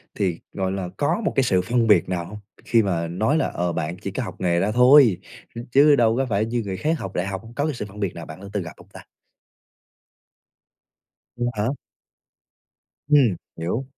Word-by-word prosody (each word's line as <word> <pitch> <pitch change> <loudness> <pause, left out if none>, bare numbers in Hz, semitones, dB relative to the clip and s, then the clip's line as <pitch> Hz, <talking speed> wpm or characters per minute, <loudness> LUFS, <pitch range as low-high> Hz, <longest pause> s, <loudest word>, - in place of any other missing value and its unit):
thì, 90 -5 -1
gọi 95 -1 -2
là, 95 -2 -4
có 145 +10 0
một - - +1
cái 135 - +3
sự 95 -7 +2
phân 120 +4 0
biệt 105 - +4
nào 85 -2 -2
hông? 105 +4 -9 0.3
Khi 115 -2 +3
mà 85 -4 -1
nói 110 - 0
là, - - +1
ờ, 85 0 -2
bạn 85 +3 -3
chỉ 100 - -6
có 130 - -3
học 95 -4 -7
nghề 85 -1 +2
ra 100 +4 0
thôi, 125 -3 +6 0.4
ch - - -9
chứ 145 +2 +6
đâu 115 -2 +2
có 135 - +1
phải 105 0 +1
như 120 +1 -2
người 95 -2 -4
khác 155 +5 -1
học 95 -1 -6
đại 90 +2 -2
học. 95 0 -4
Có 145 - 0
cái 155 - -1
sự 110 -5 -5
phân 105 +1 -12
biệt 100 -4 -2
nào 85 - -7
bạn 80 +3 -10
đã 100 - -9
từng 100 -3 -1
gặp 85 - -9
hông - - -17
ta? - - -10 2.4
V 120 - -3
hả? 105 +1 -1 1.4
Ừm, 135 -10 +4 0.2
hiểu. 90 +11 -3
100 Hz, 215 wpm, -23 LUFS, 90-120 Hz, 2.4 s, thôi